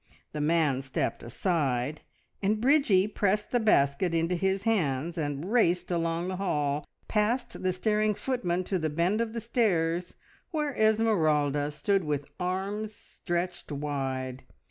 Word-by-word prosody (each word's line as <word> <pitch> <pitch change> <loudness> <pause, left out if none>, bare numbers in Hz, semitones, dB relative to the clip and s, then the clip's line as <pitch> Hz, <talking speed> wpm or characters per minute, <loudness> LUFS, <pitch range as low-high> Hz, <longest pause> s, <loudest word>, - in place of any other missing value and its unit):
The 150 - -3
man 150 -4 +2
stepped 135 0 -2
aside, 140 - -1 0.4
and 210 +2 +1
Bridgie 235 -7 +4
pressed 210 0 0
the 245 - +3
basket 165 -5 +2
into 165 +2 +1
his 190 +2 0
hands 165 - 0
and 150 +3 -3
raced 180 -7 +2
along 165 0 0
the 185 0 -3
hall, 150 -6 -1 0.2
past 220 +4 0
the 185 - +1
staring 210 +3 +1
footmen 185 -10 -1
to 185 0 -1
the 160 -1 -1
bend 175 +8 +1
of 225 -1 -2
the 230 - -3
stairs, 180 -7 0 0.3
where 300 -3 -1
Esmeralda 155 -10 +2
stood 195 +5 0
with 145 -2 -2
arms 200 +4 -2
stretched 175 -3 -4
wide. 135 -3 -3
180 Hz, 140 wpm, -28 LUFS, 150-210 Hz, 0.4 s, Bridgie